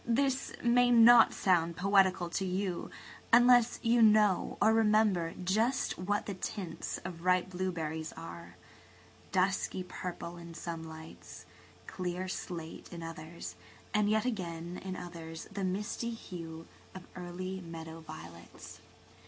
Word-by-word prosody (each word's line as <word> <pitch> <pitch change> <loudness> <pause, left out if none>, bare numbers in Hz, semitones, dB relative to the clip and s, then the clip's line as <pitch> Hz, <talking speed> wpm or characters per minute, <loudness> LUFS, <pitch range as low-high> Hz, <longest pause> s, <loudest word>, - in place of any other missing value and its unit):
This 265 +3 +1
may 245 +1 +4
not 235 -1 +8
sound 170 -3 +1
poetical 190 -2 +3
to 195 - -1
you 185 -1 -2 0.4
unless 245 0 +6
you 235 0 +4
know 210 -3 +4
or 220 +2 +5
remember 215 -6 +3
just 220 +7 +1
what 205 +3 -1
the 200 - -4
tints 185 -2 -5
of 175 -2 -7
ripe 185 0 +2
blueberries 165 -4 -3
are–dusky 185 +3 -4
purple 175 -1 -6
in 170 -1 -10
some 165 -1 -5
lights, 160 0 -11 0.4
clear 180 0 -4
slate 170 -3 -6
in 170 -2 -7
others, 165 0 -7 0.4
and 210 -1 +3
yet 220 +2 +2
again 175 -6 -4
in 190 -1 -4
others 165 -2 -8
the 200 -1 -4
misty 205 +5 -2
hue 165 -7 -8 0.3
of 185 - -9
early 185 +1 -5
meadow 165 -1 -8
violets. 85 - -11
185 Hz, 125 wpm, -32 LUFS, 170-210 Hz, 0.4 s, not